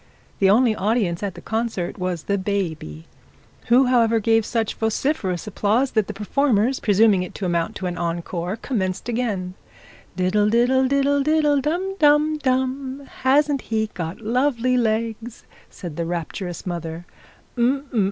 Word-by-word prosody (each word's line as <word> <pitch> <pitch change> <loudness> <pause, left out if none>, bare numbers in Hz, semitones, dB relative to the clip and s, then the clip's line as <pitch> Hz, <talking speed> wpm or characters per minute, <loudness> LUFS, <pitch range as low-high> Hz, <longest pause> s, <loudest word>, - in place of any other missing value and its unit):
The 195 - +4
only 225 +2 +4
audience 200 -5 0
at 200 -3 -3
the - - -10
concert 220 -5 -3
was 180 -3 -2
the 200 -1 -1
baby, 165 - -3 0.6
who 250 +3 +5
however 230 -3 +3
gave 225 0 +2
such 225 -3 -1
vociferous 220 - -1
applause, 215 +5 +1
that 215 -3 +1
the - - -5
performers 245 +2 +1
presuming 205 -2 +4
it 180 - -6
to 195 - -4
amount 170 -2 -1
to 185 - -5
an 180 -1 -3
encore, 170 +2 -3
commenced 200 -6 -3
again. 215 -7 -2 0.6
'Diddle, 195 +3 +2
diddle, 250 +3 +3
diddle, 280 +1 +2
diddle, 295 -1 +2
dum, 360 +7 -2
dum, 300 0 +4
dum: 265 +1 -1 0.2
hasn't 280 +1 +3
he 220 -1 0
got 170 +4 -5
lovely 250 +2 +1
legs?' 230 0 -2 0.3
said 170 -5 -8
the 170 - -1
rapturous 175 +1 -5
mother. 170 -1 -5
220 Hz, 140 wpm, -22 LUFS, 185-260 Hz, 0.6 s, who